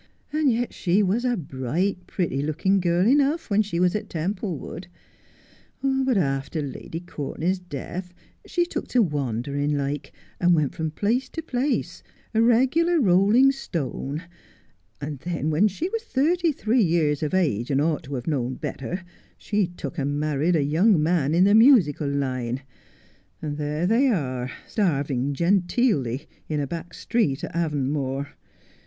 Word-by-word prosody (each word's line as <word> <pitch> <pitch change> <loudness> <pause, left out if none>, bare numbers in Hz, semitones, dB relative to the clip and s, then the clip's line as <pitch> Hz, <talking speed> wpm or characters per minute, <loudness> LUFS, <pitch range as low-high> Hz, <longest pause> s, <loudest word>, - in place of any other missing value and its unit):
And 305 -3 +3
yet 240 +1 -1
she 190 +3 +2
was 205 +6 +1
a 245 -2 +1
bright, 170 +6 -2
pretty 155 -7 -1
looking 165 +7 +1
girl 175 0 +2
enough 285 +2 +2
when 205 +1 +4
she 195 -5 -2
was 180 0 +3
at 210 0 -3
Templewood. 175 0 -4 1.0
But 265 -3 +2
after 135 -1 -1
Lady 145 +4 -6
Courtenay's 175 +2 -3
death 180 +2 -6 0.4
she 350 -1 +1
took - - -4
to 245 -2 +3
wandering 145 - -1
like, 140 0 -3 0.3
and 175 -1 +4
went 150 -4 0
from 160 -1 -2
place 220 - 0
to 325 - -6
place, 265 0 -1 0.3
a 225 - +3
regular 265 +9 +3
rolling 210 +5 +5
stone, 160 - -4 0.8
and 145 -1 -5
then 160 0 -2
when 170 +8 +4
she 210 - -3
was 455 +2 -2
thirty 335 - +1
three 245 -3 +1
years 160 -5 +2
of 155 +3 -1
age, 140 - +1
and 135 -1 +2
ought 155 0 +1
to 140 +1 -5
have 125 -1 -5
known 130 -5 -1
better, 175 +11 -5 0.3
she 205 -3 0
took 175 -1 -7
and 145 +1 -1
married 155 +3 +1
a 150 - +2
young 165 +7 +3
man 160 -2 +2
in 180 - +5
the 200 +1 +5
musical 215 - +5
line, 130 -2 -2 0.8
and 150 -1 -4
there 150 +3 -1
they 230 +8 +3
are 130 - -1 0.2
starving 140 - 0
genteelly 175 - +1 0.2
in 150 -1 -1
a 145 - 0
back 170 +4 -7
street 205 - 0
at - - -5
Avonmore. 140 -3 -1
170 Hz, 155 wpm, -24 LUFS, 145-215 Hz, 1.0 s, rolling